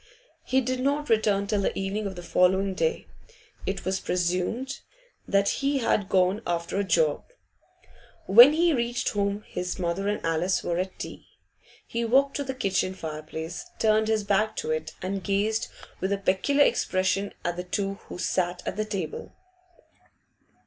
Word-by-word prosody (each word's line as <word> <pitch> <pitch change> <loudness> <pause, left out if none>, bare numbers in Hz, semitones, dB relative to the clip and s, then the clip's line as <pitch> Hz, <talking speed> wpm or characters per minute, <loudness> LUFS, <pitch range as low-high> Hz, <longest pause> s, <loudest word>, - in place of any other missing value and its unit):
He 265 +1 +2
did 255 0 -2
not 285 +2 0
return 210 -2 +2
till 205 0 0
the - - -1
evening 200 +2 -2
of 190 - -6
the 175 - -8
following 190 +2 +2
day. 475 - -1 0.6
It - - -3
was 190 0 0
presumed 180 +9 -1 0.5
that 200 0 +2
he 275 +1 +1
had 215 -6 +1
gone 185 +3 +2
'after 170 +2 -1
a - - +2
job.' 165 - +1 0.9
When 240 +9 +9
he 335 +1 +3
reached 240 -1 0
home 200 0 -1
his 180 0 -4
mother 180 +2 -1
and 205 - 0
Alice 165 +3 +1
were 170 0 -1
at 185 0 -3
tea. - - -8 0.6
He 235 0 -3
walked 270 +4 +3
to 285 - -2
the 265 -1 -4
kitchen 190 -5 0
fireplace, 160 - -6
turned 220 0 +3
his 220 -1 +1
back 210 +2 +1
to 155 - -3
it, 155 0 -3
and 190 0 -3
gazed 210 +2 0 0.3
with 190 +2 -1
a 200 - +2
peculiar 200 +10 +3
expression 190 +2 0
at 175 0 0
the 180 - -4
two 195 +2 -3
who - - -6
sat 180 0 -1
at 215 +1 -3
table. 185 -7 -4
195 Hz, 165 wpm, -26 LUFS, 180-220 Hz, 0.9 s, When